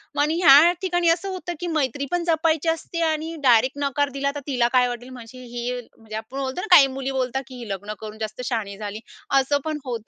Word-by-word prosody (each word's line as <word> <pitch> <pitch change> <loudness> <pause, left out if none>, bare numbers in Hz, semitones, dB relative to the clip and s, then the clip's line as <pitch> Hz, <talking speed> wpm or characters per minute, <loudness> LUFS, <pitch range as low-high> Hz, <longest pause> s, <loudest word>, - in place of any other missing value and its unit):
मग - - +1
आणि 305 +2 +1
ह्या 310 +2 +8
ठिकाणी 350 -2 +1
असं 350 +4 +1
होतं 360 -2 -5
की 350 - -4
मैत्री 280 0 -1
पण 350 -1 0
जपायची 325 -1 +1
असते 330 +1 -3
आणि 315 +1 -3
डायरेक्ट 255 +2 +4
नकार 285 +1 0
दिला 280 0 0
तर - - -3
तिला 250 -4 +2
काय 250 -1 +4
वाटेल 245 +1 -6
म्हणजे 255 0 -11
ही 240 +1 -4 0.2
म्हणजे 220 -1 -10
आपण 235 +5 -6
बोलतो 265 +6 -3
ना 435 - -5
काही 275 -5 +8
मुली 270 0 -2
बोलतात 265 0 -2
की 260 - -11
"ही 230 - -9
लग्न 205 +2 -5
करून 215 0 -8
जास्त 215 +2 -5
शहाणी 205 -5 -3
झाली" 210 0 -6 0.4
असं 285 +2 +1
पण 310 -1 -2
होतं, 235 -4 -5
265 Hz, 225 wpm, -23 LUFS, 235-315 Hz, 0.4 s, ह्या